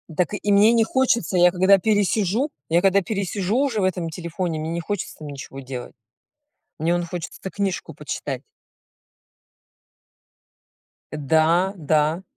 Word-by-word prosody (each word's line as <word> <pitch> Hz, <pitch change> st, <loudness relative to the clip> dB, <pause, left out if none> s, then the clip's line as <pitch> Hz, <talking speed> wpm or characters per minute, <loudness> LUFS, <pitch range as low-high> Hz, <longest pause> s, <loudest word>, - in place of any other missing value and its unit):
Так 180 Hz, -1 st, +1 dB
и 205 Hz, 0 st, -1 dB
мне 210 Hz, +3 st, +6 dB
не 230 Hz, -, +4 dB
хочется, 235 Hz, -7 st, +1 dB
я 175 Hz, 0 st, +6 dB
когда 190 Hz, +2 st, +5 dB
пересижу 210 Hz, -, +1 dB, 0.2 s
я 170 Hz, +2 st, +3 dB
когда 195 Hz, +1 st, +4 dB
пересижу 200 Hz, +1 st, -2 dB
уже 265 Hz, -5 st, +1 dB
в -, -, +1 dB
этом 180 Hz, -3 st, -1 dB
телефоне, 170 Hz, 0 st, -4 dB
мне 160 Hz, +1 st, -4 dB
не 170 Hz, -, -2 dB
хочется 205 Hz, +3 st, -4 dB
там 155 Hz, -, -8 dB
ничего 135 Hz, -1 st, -8 dB
делать. 125 Hz, -2 st, -7 dB, 0.9 s
Мне 165 Hz, +2 st, +1 dB
вон 175 Hz, 0 st, 0 dB
хочется 170 Hz, -1 st, -6 dB
книжку 195 Hz, -3 st, -3 dB
почитать. -, -, -5 dB, 2.7 s
Да, 160 Hz, +6 st, +2 dB
да. 155 Hz, +2 st, +1 dB
180 Hz, 135 wpm, -23 LUFS, 160-200 Hz, 2.7 s, мне